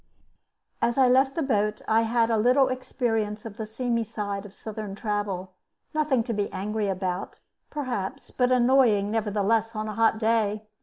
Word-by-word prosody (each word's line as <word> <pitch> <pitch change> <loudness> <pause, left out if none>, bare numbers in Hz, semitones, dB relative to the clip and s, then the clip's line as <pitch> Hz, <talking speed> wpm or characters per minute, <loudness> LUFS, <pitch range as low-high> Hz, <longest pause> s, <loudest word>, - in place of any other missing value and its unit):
As 235 +2 +1
I 265 -1 +6
left 265 +2 +3
the 325 - 0
boat 210 -5 0
I 220 +1 +4
had 230 0 +2
a 225 - +3
little 255 +4 +4
experience 225 -5 -2
of 220 -2 -8
the 220 -2 -4
seamy 230 +1 -1
side 205 -2 -4
of 195 - -17
Southern 215 -2 -6
travel; 200 -3 -3 0.4
nothing 300 -6 +2
to 230 - -3
be 205 -1 -2
angry 210 +2 -2
about, 185 -1 -3 0.3
perhaps, 255 -3 -4
but 250 0 +1
annoying, 240 -5 +4
nevertheless, 220 +1 0
on 215 0 -3
a 215 - -4
hot 225 0 +3
day. 220 -2 +1
220 Hz, 165 wpm, -26 LUFS, 205-245 Hz, 0.4 s, I